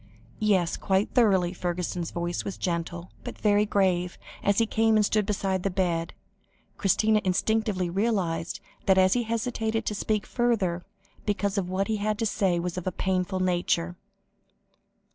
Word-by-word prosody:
"Yes, 190 Hz, -5 st, +2 dB
quite 195 Hz, +1 st, 0 dB
thoroughly." 190 Hz, -7 st, +3 dB
Fergusson's 175 Hz, -1 st, -3 dB
voice 175 Hz, 0 st, -3 dB
was 195 Hz, -, -5 dB
gentle, 170 Hz, 0 st, -3 dB
but -, -, -7 dB
very 210 Hz, 0 st, +3 dB
grave, 180 Hz, -3 st, +1 dB, 0.2 s
and -, -, 0 dB
as 200 Hz, -, +3 dB
he 230 Hz, -, +4 dB
came 225 Hz, 0 st, +2 dB
and 215 Hz, -1 st, +4 dB
stood 210 Hz, -1 st, +1 dB
beside 195 Hz, -3 st, 0 dB
the 195 Hz, -, 0 dB
bed, 175 Hz, -3 st, -1 dB, 0.6 s
Christina 215 Hz, +2 st, +2 dB
instinctively 195 Hz, 0 st, +1 dB
realised 175 Hz, -4 st, -1 dB, 0.3 s
that 190 Hz, -1 st, +5 dB, 0.2 s
he 245 Hz, -, +2 dB
hesitated 225 Hz, -1 st, -2 dB
to -, -, -1 dB
speak 210 Hz, +1 st, -1 dB
further, 200 Hz, -8 st, 0 dB, 0.4 s
because 200 Hz, -1 st, 0 dB
what 185 Hz, +2 st, -2 dB
he 220 Hz, -, 0 dB
had 210 Hz, +1 st, -1 dB
to 225 Hz, -, -1 dB
say 195 Hz, -5 st, +1 dB
was 180 Hz, +1 st, -3 dB
of 180 Hz, -, -8 dB
a -, -, +1 dB
painful 185 Hz, 0 st, -1 dB
nature. 175 Hz, -1 st, 0 dB
195 Hz, 155 wpm, -27 LUFS, 180-215 Hz, 0.6 s, that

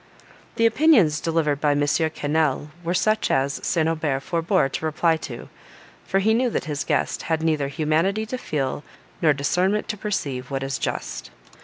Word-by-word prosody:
The 230 Hz, -, +2 dB
opinions 225 Hz, -, +4 dB
delivered 155 Hz, -3 st, 0 dB
by 150 Hz, -1 st, +3 dB
M. 145 Hz, -, 0 dB
Quesnel, 150 Hz, -1 st, 0 dB
were 170 Hz, +2 st, -1 dB
such 215 Hz, +3 st, +1 dB
as 135 Hz, +1 st, +1 dB
St. 160 Hz, -2 st, +1 dB
Aubert 155 Hz, -4 st, -1 dB
forebore 170 Hz, 0 st, +1 dB
to 135 Hz, -, -5 dB
reply 160 Hz, +1 st, +2 dB
to, 125 Hz, -6 st, -8 dB, 0.6 s
for 195 Hz, -, +1 dB
he 210 Hz, +3 st, +3 dB
knew 245 Hz, +2 st, +2 dB
that -, -, -2 dB
his 150 Hz, -1 st, -3 dB
guest -, -, -1 dB
had 160 Hz, -1 st, 0 dB
neither 155 Hz, -4 st, +1 dB
humanity 160 Hz, +9 st, 0 dB
to 255 Hz, +4 st, -4 dB
feel, 145 Hz, -, -2 dB, 0.4 s
nor 160 Hz, -3 st, +5 dB
discernment 180 Hz, +9 st, 0 dB
to 210 Hz, -, -2 dB
perceive, 140 Hz, -12 st, -3 dB
what 135 Hz, -1 st, -3 dB
is 135 Hz, -1 st, -3 dB
just. -, -, -4 dB
160 Hz, 170 wpm, -23 LUFS, 145-190 Hz, 0.6 s, nor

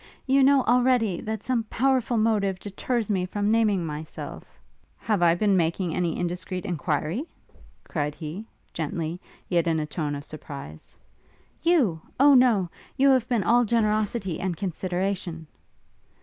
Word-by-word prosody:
you 275 Hz, +1 st, +4 dB
know, 270 Hz, 0 st, +5 dB
already, 245 Hz, -6 st, +2 dB
that 220 Hz, -1 st, -4 dB
some 250 Hz, -2 st, 0 dB
powerful 255 Hz, 0 st, +1 dB
motive 210 Hz, -4 st, +1 dB
deters 215 Hz, +3 st, -2 dB
me 190 Hz, -3 st, +1 dB
from 205 Hz, +3 st, -1 dB
naming 210 Hz, -6 st, +2 dB
myself 155 Hz, 0 st, -8 dB, 0.2 s
' -, -, -38 dB
'Have 210 Hz, -5 st, -1 dB
I 170 Hz, -1 st, +5 dB
been 200 Hz, +1 st, +2 dB
making 170 Hz, 0 st, 0 dB
any 175 Hz, -3 st, -1 dB
indiscreet 180 Hz, +1 st, -3 dB
enquiry?' 165 Hz, -, -2 dB, 0.6 s
cried 150 Hz, -2 st, -3 dB
he, 175 Hz, +7 st, -7 dB, 0.3 s
gently, 165 Hz, +2 st, -3 dB, 0.3 s
yet 170 Hz, -2 st, +1 dB
in 160 Hz, -1 st, +2 dB
a 155 Hz, -, -1 dB
tone 150 Hz, -1 st, -3 dB
of 145 Hz, 0 st, -7 dB
surprise. 140 Hz, -, -9 dB, 0.6 s
'You? 265 Hz, -, +2 dB, 0.2 s
O 285 Hz, +1 st, +7 dB
no! 240 Hz, -8 st, +4 dB, 0.3 s
You 275 Hz, +1 st, +5 dB
have 255 Hz, -2 st, +2 dB
been 235 Hz, -5 st, +1 dB
all 240 Hz, +7 st, +4 dB
generosity 215 Hz, -4 st, 0 dB
and 180 Hz, -3 st, -2 dB
consideration!' 180 Hz, -2 st, -3 dB
195 Hz, 145 wpm, -25 LUFS, 170-230 Hz, 0.6 s, O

